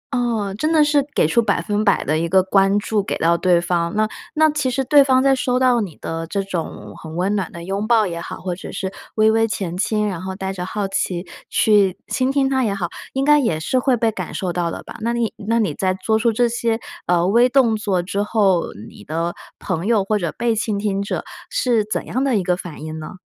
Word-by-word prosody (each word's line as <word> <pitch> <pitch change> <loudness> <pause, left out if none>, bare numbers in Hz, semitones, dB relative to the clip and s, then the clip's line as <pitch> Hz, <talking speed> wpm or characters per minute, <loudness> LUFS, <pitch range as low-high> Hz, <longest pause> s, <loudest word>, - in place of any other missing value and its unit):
哦， 225 -5 -1
真 310 +1 +1
的 310 -2 +5
是 295 -1 +3
给 - - +4
出 200 +9 +3
100% 210 -1 +1
的 155 +1 0
一 170 0 -1
个 190 0 +4
关 195 +1 +3
注 210 0 0
给 - - -3
到 170 +1 +3
对 175 0 +3
方。 170 -1 -1
那 215 0 +2 0.3
那 315 0 +5
其 295 -3 -1
实 265 +1 -1
对 285 +2 +6
方 260 -1 +3
在 275 0 +4
收 250 -1 0
到 250 -2 +3
你 180 -7 -5
的 165 0 -4
这 200 +1 -2
种 160 - -5
很 160 0 -8
温 190 +4 0
暖 190 -4 -2
的 170 0 -9
拥 200 +4 -3
抱 225 -3 +4
也 170 -2 -4
好， - - -6
或 180 -1 -3
者 185 - -9
是 190 0 -4 0.2
微 220 0 +4
微 225 0 +2
前 190 -6 -3
倾， 210 +3 0
然 185 -3 -4
后 190 0 -5
带 190 0 -4
着 180 -1 -5
好 205 -1 -2
奇 180 -2 -2 0.2
去 205 -4 +3
倾 260 0 0
听 275 -1 +2
他 265 -1 +1
也 205 -3 0
好， 175 -3 -3 0.2
应 270 +1 0
该 295 0 +6
也 165 - 0
是 215 +11 0
会 250 0 +2
被 225 -1 +1
感 - - -6
受 185 -3 -2
到 175 -1 -1
的 - - -6
吧， - - -10
那 235 +1 0
你 235 -2 -1
那 225 +2 -1
你 205 -10 +1
在 185 +2 0
做 220 +3 0
出 235 0 +2
这 240 +2 +2
些， 230 -1 -1 0.3
呃， 175 -1 +3
微 240 +5 +4
动 245 -4 +3
作 200 -4 -1
之 200 +3 -2
后， 200 -5 +2 0.2
你 - - -14
的 165 +6 -2 0.2
朋 185 +1 -3
友 220 -4 +3
或 210 +2 0
者 170 -4 -2
被 235 -1 0
倾 215 -2 -1
听 200 -1 -1
者 200 - -3 0.3
是 245 - +1
怎 215 - -3
样 260 +3 -1
的 260 -6 +2
一 190 - 0
个 180 -1 +1
反 170 -4 -9
应 155 0 -6
呢？ 155 - -8
205 Hz, 260 characters per minute, -20 LUFS, 180-235 Hz, 0.3 s, 对